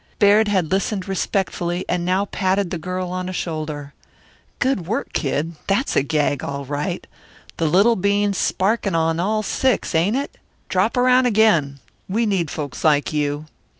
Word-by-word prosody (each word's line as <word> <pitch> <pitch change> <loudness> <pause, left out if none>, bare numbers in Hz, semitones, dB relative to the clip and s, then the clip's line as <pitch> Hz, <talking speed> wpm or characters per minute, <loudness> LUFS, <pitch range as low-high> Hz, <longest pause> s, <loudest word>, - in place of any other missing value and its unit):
Baird 210 +1 +5
had 185 -6 0
listened 195 0 -1
respectfully 185 -2 -1
and 175 -1 -1
now 185 +3 +1
patted 190 -1 0
the 175 - -3
girl 180 +2 -4
on 185 0 -3
a - - -5
shoulder. 155 -4 -4 0.6
"Good 245 -10 0
work, 220 - -3
Kid! 155 +3 -1
That's 200 +8 +1
a - - +4
gag, 145 -1 0
all 140 0 -4
right. 145 +6 -3 0.5
The 165 - +1
little 200 +9 +4
bean's 200 0 +1
sparking 200 -1 0
on 165 0 +1
all 215 +4 0
six, 255 0 0
ain't 175 +8 +2
it? 280 +2 -4 0.3
Drop - - +1
around 250 0 +4
again. 170 - +3 0.3
We 225 +5 +1
need 190 -7 0
folks 145 -4 -5
like 150 -1 +3
you. 145 0 -1
185 Hz, 160 wpm, -21 LUFS, 155-205 Hz, 0.6 s, Baird